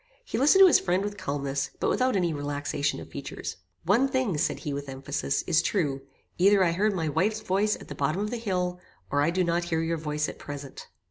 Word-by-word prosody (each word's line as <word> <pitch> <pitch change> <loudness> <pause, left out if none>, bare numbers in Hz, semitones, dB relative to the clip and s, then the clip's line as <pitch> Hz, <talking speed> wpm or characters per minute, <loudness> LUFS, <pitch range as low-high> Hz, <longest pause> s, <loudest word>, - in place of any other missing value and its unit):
He 220 - -3
listened 300 +9 +6
to - - +10
his 345 - +6
friend 185 +1 0
with 205 0 -3
calmness, 140 -5 -2
but - - 0
without 255 -2 +1
any 175 -4 +1
relaxation 145 0 -2
of - - -11
features. - - -6 0.3
"One 225 +10 +3
thing," 260 -9 0
said 170 - 0
he 150 -4 -3
with 140 0 -5
emphasis, 135 +1 -2
"is 165 -3 +3
true; 150 -8 0 0.4
either 195 +1 +5
I 170 - +3
heard 200 +4 +1
my 165 -3 -1
wife's 210 +8 0
voice 210 +1 +1
at - - -12
the - - -6
bottom 145 +6 -1
of 210 +1 -2
the 245 - -2
hill, 180 -5 -2 0.3
or 145 - +2
I 145 - +3
do 180 +2 +1
not 170 0 0
hear 165 -1 0
your 165 0 -1
voice 150 -1 -2
at - - -8
present." 140 -2 -8
175 Hz, 225 wpm, -27 LUFS, 145-205 Hz, 0.4 s, to